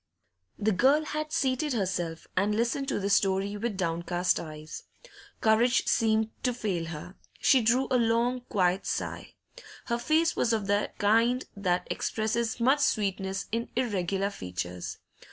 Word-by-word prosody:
The 215 +1 +1
girl 270 +10 +3
had 305 0 -3
seated 285 -2 0
herself, 175 -6 -2
and 205 +3 +2
listened 240 +5 0
to - - -1
this 200 0 +1
story 195 +1 +2
with 210 -1 -3
downcast 175 0 0
eyes. 155 -1 -8 0.6
Courage 235 +3 +3
seemed 220 -1 +2
to 250 -2 0
fail 190 -8 -2
her; 165 +2 -7 0.3
she 265 - +5
drew 240 +4 +3
a 250 - +4
long, 235 +2 +1
quiet 185 -1 +1
sigh. - - -4 0.5
Her 235 -1 -1
face 320 +6 +2
was 235 - +1
of 215 -3 0
the 205 +1 +1
kind 230 +5 +3
that 180 -3 0
expresses 225 +2 -1
much 265 +5 +4
sweetness 195 -6 0
in 230 +1 -2
irregular 200 -5 0
features. 90 - -5
215 Hz, 145 wpm, -28 LUFS, 185-245 Hz, 0.6 s, she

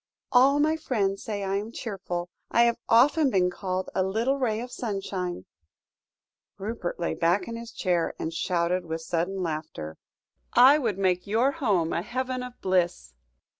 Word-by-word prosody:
"'All 270 +3 +5
my 310 +2 +2
friends 200 -10 -1
say 205 -2 -3
I 195 0 0
am 210 +3 -4
cheerful. 180 -6 -5 0.2
I 235 - +4
have 235 0 +2
often 275 +6 +5
been 180 -5 +2
called 185 0 -3
a - - +1
little 225 +9 0
ray 225 -4 0
of 245 +1 -6
sunshine'" 195 - -4 1.1
Rupert 200 -3 -4
lay 170 - -1
back 175 +3 +1
in 230 - -5
his 230 0 -8
chair, 175 -3 0
and 160 - -4
shouted 180 +1 0
with 160 -1 -4
sudden 175 +3 -2
laughter. 155 - -5 0.6
"'I 265 +5 +7
would 225 -8 -1
make 185 -2 +1
your 230 +6 +2
home 205 - 0
a - - 0
heaven 255 +4 -3
of 250 0 -8
bliss.'" 175 - 0
195 Hz, 165 wpm, -27 LUFS, 180-240 Hz, 1.1 s, I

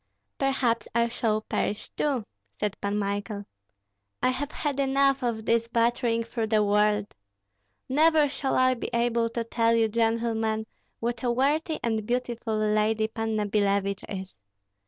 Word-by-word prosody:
"Perhaps 265 -4 +1
I 235 0 +3
shall 220 -2 0
perish 210 -1 -3
too," 270 -7 0 0.3
said 210 -1 -1
Pan 200 +1 -1
Michael. 205 0 -3 0.8
"I - - +5
have 280 +3 -2
had 285 -2 -2
enough 275 0 +3
of 230 -3 -2
this 230 0 +2
battering 235 0 +1
through 230 -1 -3
the 215 -1 +3
world. 210 0 +2 0.7
Never 310 +2 +4
shall 275 -1 -2
I 255 0 +4
be 245 - -5
able 235 -1 +1
to 230 0 -2
tell 230 0 +2
you, 225 -1 +3
gentlemen, 225 -1 0 0.4
what 235 +1 -2
a 250 - 0
worthy 295 +6 +1
and 220 -2 0
beautiful 240 -1 -2
lady 215 +1 +1
Panna 220 -1 -1
Billevich 200 -1 0
is. 190 -2 -6
230 Hz, 145 wpm, -27 LUFS, 215-250 Hz, 0.8 s, I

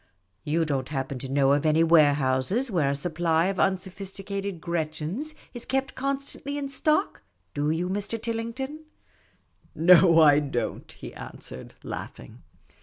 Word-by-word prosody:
You 165 +2 +1
don't 135 -3 -2
happen 135 -2 -3
to 135 - -7
know 135 0 +3
of 145 - +1
any 155 +1 +4
warehouse 150 - +3
where 160 -7 +2
a 140 - 0
supply 165 +2 +1
of 190 0 -1
unsophisticated 195 0 -2
Gretchens 170 - -3 0.2
is 240 -2 -2
kept 270 0 -1
constantly 275 +1 -3
in 280 -1 -3
stock, 305 +7 0 0.3
do 145 0 0
you, 165 +3 0
Mr. 205 +4 -3
Tillington? 235 +7 -4 0.3
" - - -36 0.2
" - - -34
No, 170 0 +6
I 145 -2 +7
don't," 140 -5 -3
he - - -10
answered, 65 +1 -8
laughing. - - -8
175 Hz, 145 wpm, -26 LUFS, 150-230 Hz, 0.3 s, I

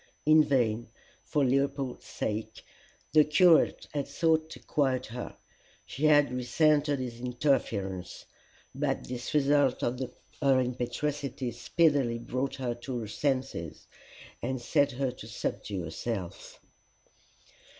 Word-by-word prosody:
In 155 +1 +7
vain, 120 -5 +1 0.3
for 145 -2 +1
Leopold's 135 0 -1
sake, 110 +1 -4 0.5
the 155 -1 +7
curate 165 +2 +4
had 145 -2 -2
sought 160 -1 +1
to - - -9
quiet 135 -3 0
her: 120 +2 -7 0.5
she 150 - -3
had 145 -3 +5
resented 145 +3 +2
his 125 -2 -5
interference; 110 -8 -1 0.5
but 135 0 -1
this 125 -1 -5
result 145 -2 +3
of 125 +1 -1 0.4
her 135 -2 +4
impetuosity 130 +2 -2
speedily 130 0 +2
brought 130 +3 -3
her 125 -2 -2
to 120 +2 -5
her 110 - -5
senses, 130 - -2 0.6
and 130 +2 -2
set 140 +3 +2
her 130 0 -1
to 125 - -11
subdue 95 -4 -4
herself. 90 +3 -5
130 Hz, 120 wpm, -29 LUFS, 120-145 Hz, 0.6 s, In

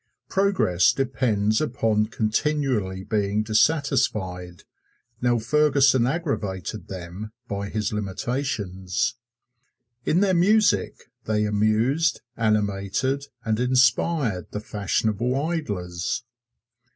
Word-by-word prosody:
Progress 110 - +3
depends 110 -5 +1
upon 115 -7 +1
continually 110 -4 -1
being 105 0 0
dissatisfied. 110 - 0 0.6
Now 120 -1 +2
Ferguson 135 0 +3
aggravated 105 - -3
them 95 +3 -7 0.2
by 100 -1 -4
his 110 0 -2
limitations. 100 -3 -2 0.9
In 175 +7 +2
their 195 -2 +3
music 205 - +2
they 105 -1 +1
amused, 110 +10 +1
animated 105 +5 0 0.2
and 110 -1 0
inspired 125 - +2
the 105 - -4
fashionable 110 +4 -1
idlers. 105 - -3
110 Hz, 85 wpm, -24 LUFS, 100-135 Hz, 0.9 s, Progress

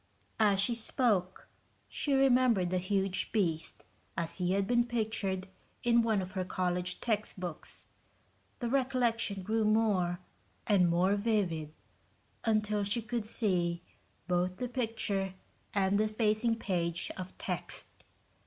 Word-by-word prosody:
As 205 -3 +4
she 235 +5 +2
spoke, 215 -5 0 0.4
she 285 - -1
remembered 250 -9 +4
the 185 - +2
huge 195 0 0
beast 165 -7 -1 0.3
as 170 +2 -3
he 180 0 +1
had 200 0 +2
been 240 +3 +3
pictured 215 -5 -2 0.4
in 235 -1 +5
one 220 -4 +1
of 185 - -7
her 185 -1 -2
college 180 -1 -1
textbooks. 200 -7 -4 0.7
The 240 - -3
recollection 240 -6 +1
grew 220 +3 +1
more 210 -5 +2 0.5
and 185 -5 +4
more 180 +3 +3
vivid, 200 -8 0 0.7
until 215 -2 +1
she 205 +3 -1
could 225 0 -3
see 175 -6 0 0.4
both 180 +1 0
the 250 - -2
picture 220 -6 -2 0.4
and 200 0 +2
the 215 - +3
facing 215 +1 +1
page 175 -5 -2
of 185 0 -7
text. - - -4
205 Hz, 125 wpm, -32 LUFS, 185-225 Hz, 0.7 s, in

